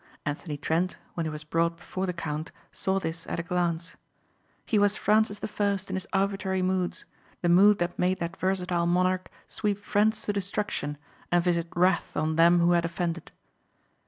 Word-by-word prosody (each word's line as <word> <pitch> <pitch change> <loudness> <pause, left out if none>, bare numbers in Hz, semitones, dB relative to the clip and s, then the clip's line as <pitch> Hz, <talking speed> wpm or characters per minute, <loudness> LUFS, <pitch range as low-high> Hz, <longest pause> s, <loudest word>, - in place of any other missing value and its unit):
Anthony 145 +1 -3
Trent 165 +5 0 0.2
when 165 -2 -2
he - - -1
was 150 0 -5
brought 165 +2 0
before 185 +2 -4
the - - 0
count 160 -1 -4 0.2
saw 190 0 0
this 165 -2 -5
at - - -3
a - - -2
glance. 175 -1 -1 0.7
He 215 - +2
was 205 0 +3
Francis 215 -1 +2
the - - -4
First 200 -2 -1
in - - -1
his 190 - -4
arbitrary 195 -1 0
moods, 185 -1 -1 0.4
the 175 - +3
mood 200 +4 +7
that 175 0 -2
made 185 +1 +2
that 170 +2 -3
versatile 180 -2 0
monarch 185 +1 +1 0.2
sweep 205 -2 -1
friends 210 +2 +1
to 205 - -1
destruction 200 -7 -2 0.3
and 175 -1 +4
visit 170 -1 +1
wrath 180 +1 +2
on 155 0 0
them 170 +1 +5
who 170 +1 +4
had 170 -1 +3
offended. 170 0 -3
180 Hz, 180 wpm, -27 LUFS, 170-195 Hz, 0.7 s, mood